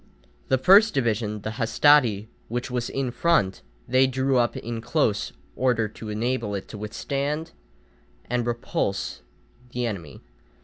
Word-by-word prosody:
The 130 - +3
first 195 - +6
division, 110 -4 0
the 110 +2 -5
hastati, 115 -3 +4 0.2
which 120 +3 -3
was 125 -1 -2
in 135 -2 -2
front, 125 - +1 0.3
they 130 +1 +4
drew 130 0 +1
up 120 -1 +1
in 115 0 -5
close 115 -3 0 0.2
order 120 -4 +1
to 110 +1 -9
enable 115 -1 -1
it 95 - -5
to 110 - -8
withstand 140 +9 -3 0.8
and 120 -1 -1
repulse 115 -4 -2 0.5
the 125 0 -1
enemy. 85 - -6
120 Hz, 135 wpm, -25 LUFS, 110-130 Hz, 0.8 s, first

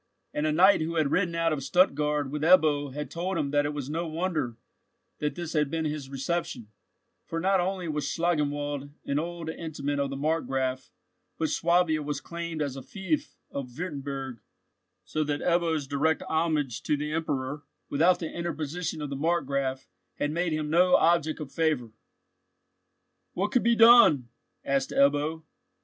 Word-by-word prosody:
And 150 +1 0
a - - +2
knight 185 +4 +5
who 165 +2 -2
had 155 -3 +1
ridden 175 -3 +1
out 165 -1 +1
of 150 - -2
Stuttgard 150 -1 +2
with 150 0 -3
Ebbo 155 -4 +4
had 150 +2 -6
told 180 +2 -2
him 145 -3 -1
that 145 0 +2
it - - -2
was 140 -3 -4
no 165 +3 -2
wonder 155 -7 -2 0.6
that 150 0 -2
this 170 -2 -5
had 150 -3 +1
been 160 +1 -2
his 150 -3 -4
reception, 135 -4 -3 0.6
for 165 - -3
not 190 +2 +2
only 185 0 -1
was 150 -2 -2
Schlangenwald 145 -4 -1 0.2
an 140 +1 0
old 170 0 -5
intimate 145 -3 -3
of 140 -1 0
the 135 - -4
Markgraf, 135 -4 -1 0.5
but 160 -1 0
Swabia 170 -2 +2
was 145 -1 -3
claimed 170 -2 -4
as 140 -2 -4
a 135 - -6
fief 245 - -3
of 125 -3 -6
Wurtemburg, 140 -7 -5 0.7
so 155 +12 -1
that 145 -1 -2
Ebbo's 170 -4 +1
direct 145 +3 0
homage 155 -7 0
to 150 - 0
the 150 +1 -3
Emperor, 145 -3 -2 0.3
without 170 +5 +3
the 165 -2 -5
interposition 165 -1 -3
of 145 - -5
the - - -2
Markgraf, 140 -4 -1 0.3
had 145 - -1
made 170 +1 0
him 155 -1 -2
no 180 +2 +5
object 165 -2 +3
of 145 -3 -7
favour. 145 -6 0 1.4
"What 200 +3 -1
could 250 -3 +3
be 235 +1 +4
done?" 225 - +7 0.4
asked 135 -1 0
Ebbo. 145 +3 +2
155 Hz, 165 wpm, -28 LUFS, 140-170 Hz, 1.4 s, done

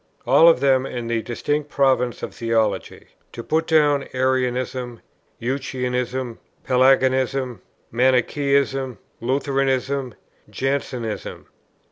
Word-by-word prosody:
All 165 - +6
of 150 -6 +3
them 135 -1 +3
in 120 -2 -5
the 115 -1 -1
distinct 145 +6 -2
province 130 -4 +1
of - - -5
theology: 115 -2 -1 0.2
to 115 - -7
put 160 +5 0
down 145 -3 +3
Arianism, 125 -1 -1 0.4
Eutychianism, 125 -1 -3 0.2
Pelagianism, 130 -2 +2 0.3
Manichæism, 130 +1 +1 0.2
Lutheranism, 135 -1 -1 0.3
Jansenism. 130 -5 -3
130 Hz, 90 wpm, -22 LUFS, 125-135 Hz, 0.4 s, All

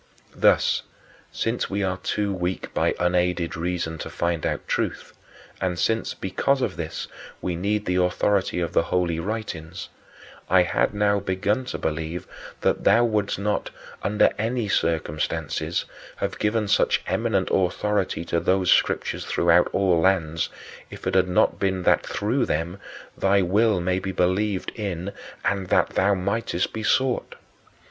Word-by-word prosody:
Thus, - - +3 0.5
since 115 +2 -1
we 100 +1 -1
are 95 -1 -1
too 100 +2 -1
weak 90 0 -3
by - - +1
unaided 90 -1 +1
reason 85 -1 -2
to - - -5
find 85 -2 -1
out - - -3
truth, - - -2 0.5
and 90 -2 -1
since, 115 +5 0
because 135 +8 0
of - - -1
this, 80 -2 -5 0.3
we 90 - -2
need 105 +4 -1
the 90 0 0
authority 90 +1 +1
of 85 - -2
the - - +4
Holy 85 -2 0
Writings, 95 -5 -5 0.6
I 95 0 +6
had 90 +4 0
now 105 0 +2
begun 100 +5 -1
to - - -4
believe 80 +2 -3 0.4
that - - +1
thou 120 +1 +5
wouldst 105 -3 0
not, 105 +1 -1 0.3
under 105 +1 +3
any 115 +1 -1
circumstances, 80 -5 -1 0.3
have - - -3
given 105 0 +1
such - - +2
eminent - - 0
authority 95 -1 0
to 85 - 0
those 95 0 +2
Scriptures - - +2
throughout 85 +1 +3
all 95 -4 +2
lands 80 -3 +1 0.4
if - - -10
it - - 0
had 95 -1 +4
not 90 - +2
been 95 -2 0
that - - +4
through 115 +7 0
them 85 +5 -2 0.4
thy 95 0 +3
will 105 +2 +3
may 90 +1 0
be 95 0 -4
believed 95 +2 0
in 100 -3 -4 0.3
and 100 -2 0
that - - +3
thou 100 +1 +2
mightest 95 -1 -1
be 110 - -4
sought. 130 +3 +1
95 Hz, 150 wpm, -24 LUFS, 90-105 Hz, 0.6 s, I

